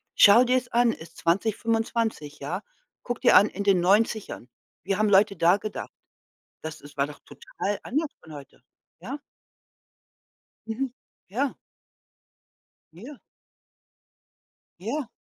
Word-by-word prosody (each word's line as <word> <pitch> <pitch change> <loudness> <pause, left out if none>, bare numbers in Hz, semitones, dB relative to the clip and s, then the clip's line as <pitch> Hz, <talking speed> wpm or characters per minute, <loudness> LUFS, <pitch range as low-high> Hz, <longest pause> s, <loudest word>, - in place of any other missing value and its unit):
schau 205 +5 +8
dir's 250 0 +1
an, 235 -1 +3
ist 160 - -13
2025, 220 -3 -1
ja? - - -4 0.4
Guck 245 -1 -4
dir - - +5
an, 205 +3 +5
in 200 - -5
den 195 -2 +4
90ern, 205 - +1 0.3
wie 195 +1 0
haben 215 0 +2
Leute 200 +1 +4
da 170 +3 +4
gedacht? 210 0 -6 0.7
Das 160 0 -7
es 145 0 -14
war 140 0 +1
doch 150 - -11
total 205 0 -5
anders 300 +5 -1
von 160 - -13
heute, 140 -3 -13 0.4
ja? 255 +11 -6 1.5
Mhm. 245 +3 -3 0.4
Ja. 260 +7 -1 1.4
Ja. 240 - -11 1.6
Ja. 235 - -3
210 Hz, 120 wpm, -26 LUFS, 175-235 Hz, 1.6 s, schau